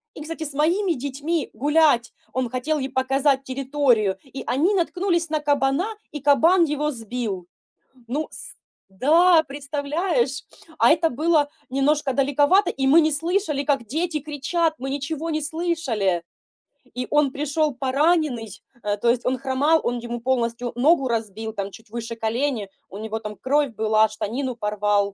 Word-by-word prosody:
и, - - -8
кстати, 325 0 -5
с 285 - -5
моими 340 +5 +2
детьми 285 +4 -3
гулять. 290 -1 +3 0.2
Он 255 -2 -1
хотел 285 +5 -1
ей 265 0 -3
показать 270 +1 +1
территорию, 260 -7 +1
и 270 0 -8
они 325 +11 +2
наткнулись 350 -2 0
на 310 -1 0
кабана 285 +3 +1 0.3
и 295 - -5
кабан 325 +6 +5
его 300 -1 0
сбил. 225 -6 -4 0.6
Ну, 295 +6 -2
с - - -9 0.4
да, 320 - +5
представляешь? 285 0 -1 0.3
А - - +5
это 325 0 +3
было 300 +2 +2 0.2
немножко 275 +1 +1
далековато, 285 +8 +3
и 270 0 -2
мы 310 +5 +7
не 310 0 +2
слышали, 330 -2 -1
как 275 -5 0
дети 315 +3 -1
кричат. 310 +3 -1
Мы 270 +1 -4
ничего 305 +3 -3
не 310 0 -1
слышали! 290 - -1 0.7
И 250 0 -2
он 295 -2 +4
пришел 295 0 -1
пораненный, 275 -3 +1 0.3
э, 205 0 -1
то 235 +3 +1
есть 245 0 -2
он 255 +1 0
хромал, 275 +5 +2
он 245 0 -1
ему 240 0 -5
полностью 240 -1 -1
ногу 270 +2 +3
разбил 220 -1 -3
там 200 -2 -4
чуть 225 +1 -15
выше 230 0 -5
колени, 225 -1 -1 0.2
у 195 - -9
него 220 +1 -4
там 210 -1 -7
кровь 280 +6 +1
была, 220 0 +3
штанину 240 +4 -3
порвал. 210 -2 0
275 Hz, 155 wpm, -23 LUFS, 235-310 Hz, 0.7 s, мы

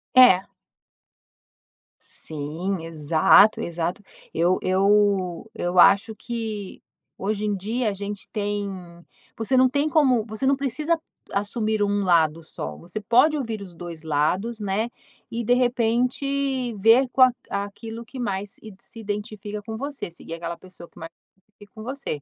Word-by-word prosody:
É. 220 -8 +8 1.6
Sim, 160 +5 -4
exato, 160 +6 +4
exato. 170 +3 -3 0.3
Eu 175 +3 +2
eu 195 -1 +2
eu 175 -4 0
acho 200 +4 +5
que 220 -4 -5 0.4
hoje 210 +2 -2
em 205 - 0
dia 220 +5 -1
a 205 - -3
gente 200 0 -6
tem 205 -1 -2 0.7
você 230 +4 0
não 255 0 +5
tem 285 +3 +1
como 260 -8 +3
você 220 +4 -4
não 275 - +4
precisa 295 +5 -1 0.3
assumir 215 +1 -1
1 205 0 +1
lado 165 -3 +2
só, - - -6
você 175 +5 -6
pode 245 +9 +4
ouvir 225 -6 -4
os 185 -3 -10
2 170 -2 -9
lados, 175 +10 0
né, 210 +3 -1 0.4
e 235 - -2
de 245 - +3
repente 250 +2 0
ver 225 +6 +5
com 260 - +2
a 255 -1 +8 0.2
aquilo 225 +3 -5
que 250 +3 -10
mais 200 -3 -3
s 215 -3 -11
se 230 - -13
identifica 210 0 -5
com 220 +1 -6
você. 280 -6 -5
Seguir 165 -1 -9
aquela 170 0 -5
pessoa 180 -1 -14
que - - -17
mais 165 0 -7
se 190 - -44
identifica 205 +2 -17
com 215 - -9
você. 245 - -4
210 Hz, 150 wpm, -24 LUFS, 185-235 Hz, 1.6 s, É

